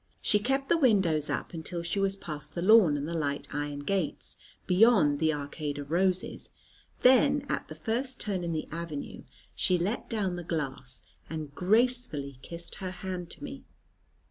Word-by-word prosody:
She 210 - +3
kept 270 +5 0
the 335 - +3
windows 190 - +3
up - - -3
until 170 +1 -4
she 170 +4 -1
was 195 0 +2
past 150 -5 -4
the 170 - -2
lawn 190 -7 +6
and 145 +1 -3
the 170 - -4
light 145 -3 -2
iron 145 0 -3
gates, 185 +2 -2 0.3
beyond 180 -7 +5
the 160 -1 +3
arcade 145 0 -4
of 145 +1 -7
roses; 185 +1 0 0.5
then, 275 +3 +5
at - - -2
the 155 - -8
first 240 - -2
turn 195 -4 -2
in 170 - -2
the 160 -1 -3
avenue, 165 -3 -6 0.3
she 180 - +2
let 195 +7 -2
down 195 -6 -1
the 175 - -5
glass 135 -6 -4 0.3
and 155 -3 -5
gracefully 200 - +1
kissed 170 +4 -8
her 185 - -2
hand 180 -1 -5
to - - -9
me. - - -7
175 Hz, 170 wpm, -29 LUFS, 150-205 Hz, 0.5 s, lawn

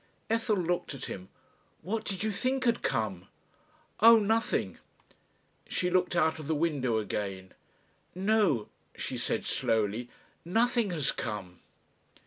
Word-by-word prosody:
Ethel 225 -2 +2
looked 175 -4 -1
at 135 - -6
him. 95 0 -7 0.5
"What 220 +3 -2
did 195 0 -3
you 220 - +1
think 260 +5 0
had 235 -2 +2
come?" 100 -5 -1 0.7
"Oh! 230 +1 +9
nothing." 220 +2 0 0.9
She 180 0 0
looked 180 -1 +2
out 160 -1 +2
of 155 - -7
the 160 - +1
window 145 -7 +1
again. 95 -3 -3 0.6
"No," 190 - +2 0.3
she - - -4
said - - -1
slowly, 110 +2 0 0.3
"nothing 230 +4 +2
has 150 -5 0
come." 100 -6 -5
170 Hz, 125 wpm, -30 LUFS, -, 0.9 s, Oh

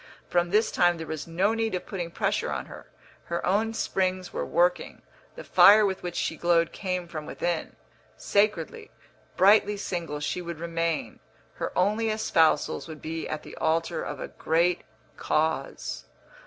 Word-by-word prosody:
From 175 0 +1
this 215 +4 +2
time 175 -1 +3
there 165 - -6
was 155 0 -5
no 185 +6 +1
need 225 -3 -1
of 180 - -4
putting 175 -4 -4
pressure - - -1
on - - -3
her; - - -12 0.4
her 170 0 -3
own 210 +5 +1
springs 185 -3 -1
were - - -2
working; 180 +1 0 0.3
the - - -8
fire 210 +1 +7
with 190 -1 -2
which 175 -1 -5
she 160 - -2
glowed 170 -1 +2
came 180 -3 -3
from 155 -3 -7
within. 170 -2 -3 0.4
Sacredly, 215 - 0 0.5
brightly 205 +1 +5
single 170 -6 -4
she 150 +4 -2
would 170 -2 -6
remain; 165 -1 -2 0.4
her - - -3
only 210 +4 +2
espousals 165 -10 +2
would 155 -2 -9
be 160 +1 -5
at 155 - -4
the - - -10
altar 165 +1 0
of 150 - -5
a - - -5
great 170 +2 +1 0.4
cause. 155 -3 -1
175 Hz, 160 wpm, -27 LUFS, 165-200 Hz, 0.5 s, fire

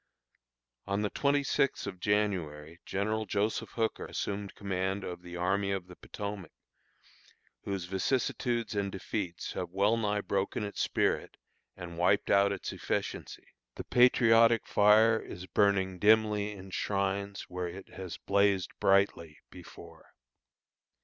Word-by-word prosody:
On 100 +1 0
the 105 - -1
twenty 140 0 +1
sixth 135 0 0
of 95 -2 -6
January, 85 -7 -1
General 110 +2 -1
Joseph 105 +2 -1
Hooker 115 -1 -2
assumed 100 -1 -4
command 95 0 -2
of 90 -1 -6
the 90 -1 -9
Army 95 +3 0
of 95 -2 -2
the 90 0 -13
Potomac, 100 -4 -7 1.1
whose 95 -3 -3
vicissitudes 115 +4 -1
and 100 -1 -1
defeats 95 -2 -4
have 90 - -4
well 100 +5 +2
nigh 105 -2 0
broken 100 +5 -1
its 100 -1 -4
spirit - - 0 0.4
and 85 -1 -8
wiped 95 +3 +2
out 100 0 +5
its 100 - -4
efficiency. - - -4 0.3
The - - -6
patriotic 115 -2 +5
fire 110 +2 +5
is 90 - -9
burning 95 -2 +1
dimly 105 0 +3
in 95 -1 -11
shrines 100 +1 -2
where 90 0 -4
it 95 +3 -9
has 95 -3 -7
blazed 100 -2 +1
brightly 95 -5 +2
before. - - -14
100 Hz, 130 wpm, -30 LUFS, 95-105 Hz, 1.1 s, out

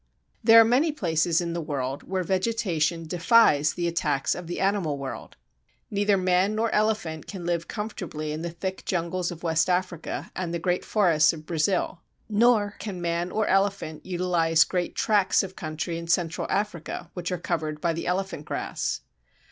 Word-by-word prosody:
There 225 0 +9
are - - +9
many 265 +8 +3
places 170 - +1
in 170 -1 -3
the 170 - -2
world 140 -3 -3
where 185 0 -2
vegetation 180 -4 0
defies 165 -3 +4
the 175 -1 -1
attacks 150 -5 0
of 175 -2 -7
the 175 - -4
animal 190 -7 0
world. 135 -1 -7 0.6
Neither 205 0 +2
man 185 +2 +2
nor 225 +1 0
elephant 210 -8 0
can 185 -4 -7
live 170 -1 -1
comfortably 180 -8 -5
in 155 +1 -4
the 170 - -3
thick 185 +3 -5
jungles 175 0 -1
of 175 -1 -8
West 165 +1 +2
Africa 180 -2 -2
and 180 -2 -3
the 170 - -1
great 180 +1 -1
forests 170 -8 +3
of 155 -1 -9
Brazil. 170 +2 0 0.3
Nor 210 -1 +3
can 205 -3 -5
either 175 - -7
man 170 +1 -1
or 215 0 0
elephant 195 -6 0
utilize 175 -3 +2
great 180 -2 -2
tracts 205 -4 +3
of 190 -1 -7
country 160 +1 -4
in 170 - -8
Central 170 -1 0
Africa 175 -4 -3
which 180 0 -4
are 180 - -1
covered 155 -3 -3
by 170 +1 0
the 165 - -4
Elephant 190 -4 -2
Grass. - - -3
175 Hz, 175 wpm, -26 LUFS, 165-195 Hz, 0.6 s, There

